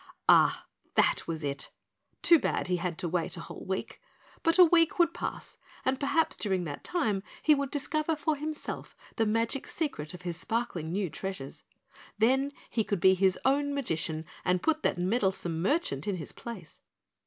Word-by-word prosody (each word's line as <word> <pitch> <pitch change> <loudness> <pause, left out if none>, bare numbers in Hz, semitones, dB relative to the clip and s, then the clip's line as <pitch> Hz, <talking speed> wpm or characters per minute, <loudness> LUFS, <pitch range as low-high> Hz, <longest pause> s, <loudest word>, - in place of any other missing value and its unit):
Ah, - - +5 0.3
that - - +3
was 160 -2 -3
it 140 -1 -2 0.5
too 335 -2 +7
bad - - -1
he 180 - +2
had 175 -1 -3
to 175 - -1
wait 170 0 -1
a - - -6
whole - - -9
week, 190 0 -4 0.4
but 330 +2 +2
a 365 - +10
week 330 -1 +4
would 340 -1 +4
pass - - -5 0.3
and 260 0 +1
perhaps 285 +3 +2
during 190 -4 -1
that 145 -4 -6
time 220 - 0 0.2
he 310 - +6
would 280 -2 0
discover 305 +3 0
for 310 +1 0
himself 305 +1 -5 0.2
the 225 - +2
magic 230 +5 0
secret 180 - -3
of 180 - -12
his 175 -2 -4
sparkling 180 -6 -2
new 195 +1 0
treasures. 175 -6 -6 0.5
Then 265 +6 +3 0.2
he 225 - +1
could 200 -2 -1
be 190 +2 +6
his 190 0 +3
own 285 +1 +2
magician 160 - -2 0.2
and 180 0 +1
put 315 0 +2
that - - +1
meddlesome 185 -4 0
merchant 190 - 0
in 200 - 0
his 160 -5 -6
place. 220 -9 -9
210 Hz, 175 wpm, -29 LUFS, 175-285 Hz, 0.5 s, a